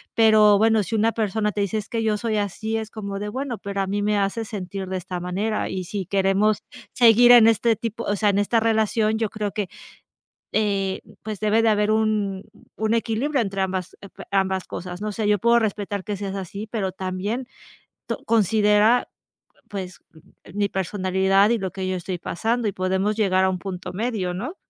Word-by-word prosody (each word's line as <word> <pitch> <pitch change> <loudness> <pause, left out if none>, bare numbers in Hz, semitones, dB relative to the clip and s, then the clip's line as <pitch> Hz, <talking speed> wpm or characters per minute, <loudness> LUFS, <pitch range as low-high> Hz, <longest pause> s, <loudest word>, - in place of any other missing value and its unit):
Pero 215 -2 +6
bueno, 220 +1 +3
si 200 - -3
una 225 +1 +2
persona 210 -1 -1
te 205 - -1
dice: 200 +2 -1
"Es 215 -1 -4
que 230 -1 -2
yo 215 -1 +1
soy 225 0 -2
así", 210 +2 -2
es 220 -1 -3
como 200 -2 -5
de: 210 +1 -4
"Bueno, 260 +1 -4
pero 200 0 -4
a 195 - -1
mí 205 +1 -1
me 210 0 +1
hace 200 +3 0
sentir 195 -2 -6
de 190 - -2
esta 180 0 -5
manera. 200 +5 -2
Y 185 -1 -4
si 195 +1 -4
queremos 195 +3 +1 0.3
seguir 240 0 +6
en 235 -2 +8
este 225 0 +3
tipo 230 +1 -4
o 205 - 0
sea, 210 - +1
en 200 0 +2
esta 215 +3 +2
relación, 220 -1 +1
yo 220 -1 -1
creo 210 -1 -3
que, 205 -3 -3 0.8
eh, 200 -3 0 0.2
pues 215 -3 -5
debe 215 +1 +3
de 225 - +3
haber 210 0 +2
un 215 -3 0 0.3
un 220 +1 0
equilibrio 230 +5 0
entre 195 -3 -1
ambas 185 -1 -3
ep 200 - -12 0.2
ambas 190 -1 0
cosas", 180 0 -6
¿no? 215 - -3
No 210 - -3
sé, 215 0 -2
yo 205 -2 +2
puedo 235 +2 +4
respetar 205 -3 -2
que 210 -1 -3
seas 195 0 -5
así, 195 +3 -6
pero 200 -5 -2
también 190 +7 -4 0.6
to - - -2
considera 215 +1 +3 0.6
pues 185 -3 -6 0.6
mi 205 0 +1
personalidad 190 +1 +1
y 235 - +1
lo 190 -1 -2
que 190 -1 -4
yo 185 - -1
estoy 180 0 -4
pasando 225 +7 -1
y - - 0
podemos 190 +3 0
llegar 190 -3 +2
a 190 - +3
un 185 - -3
punto 185 -1 -6
medio, 205 -3 -2
¿no? 235 - -5
205 Hz, 200 wpm, -23 LUFS, 190-220 Hz, 0.8 s, en